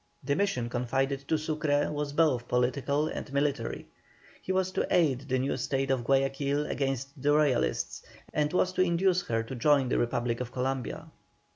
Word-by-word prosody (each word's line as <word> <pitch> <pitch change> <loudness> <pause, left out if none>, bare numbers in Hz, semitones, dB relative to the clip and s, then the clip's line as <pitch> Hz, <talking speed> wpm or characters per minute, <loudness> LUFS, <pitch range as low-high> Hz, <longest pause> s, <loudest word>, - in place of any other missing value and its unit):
The 140 +1 0
mission 195 -11 0
confided 135 +3 -1
to 160 - +2
Sucre 150 -1 0
was 145 -1 -3
both 145 -7 +2
political 140 +4 +1
and 150 - -6
military. 140 -4 -1 0.6
He - - -3
was 185 0 +1
to - - -1
aid 140 -6 +2
the 130 - +2
new 130 +1 -1
State 135 +1 -1
of 130 -3 0
Guayaquil 135 +2 +1
against 135 0 -3
the 145 +2 +3
Royalists, 150 -5 +1 0.3
and 150 0 +1
was 185 0 +1
to 185 - +1
induce 180 +1 +2
her 115 -1 0
to 115 - -8
join 135 +1 +3
the - - +1
Republic 120 0 -1
of 125 -1 -4
Columbia. 130 -2 -3
140 Hz, 170 wpm, -29 LUFS, 130-150 Hz, 0.6 s, the